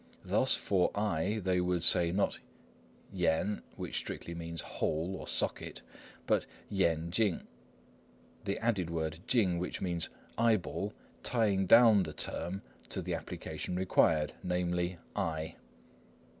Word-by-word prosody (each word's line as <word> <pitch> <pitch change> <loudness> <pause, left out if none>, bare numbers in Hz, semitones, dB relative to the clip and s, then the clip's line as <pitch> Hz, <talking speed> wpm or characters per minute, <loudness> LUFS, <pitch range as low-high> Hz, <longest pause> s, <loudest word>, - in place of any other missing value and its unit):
Thus, - - +3
for 95 -3 +2
"eye" 105 0 0
they 90 -1 +2
would 90 -2 0
say, 85 -1 +5
not 100 +3 0 0.7
yen, 90 +3 +1
which - - -2
strictly 85 - -3
means 85 -1 -5
"hole," 80 +5 -2
or - - -7
"socket," - - -1 0.4
but - - +2 0.2
yen 85 -4 +1
ching, 100 -2 +1 1.0
the 100 -1 -1
added 105 -7 0
word 80 -1 -2
ching, 95 -8 +3
which 90 - -3
means 85 -3 -1 0.3
"eyeball," 105 -2 +1 0.3
tying 100 -5 +1
down 115 -2 +8
the 80 -4 -3
term 90 +7 -2 0.3
to - - -3
the - - -2
application 90 - -4
required, 80 -5 +3
namely, 90 0 -1 0.2
"eye." 80 -1 -2
90 Hz, 125 wpm, -32 LUFS, 85-100 Hz, 1.0 s, down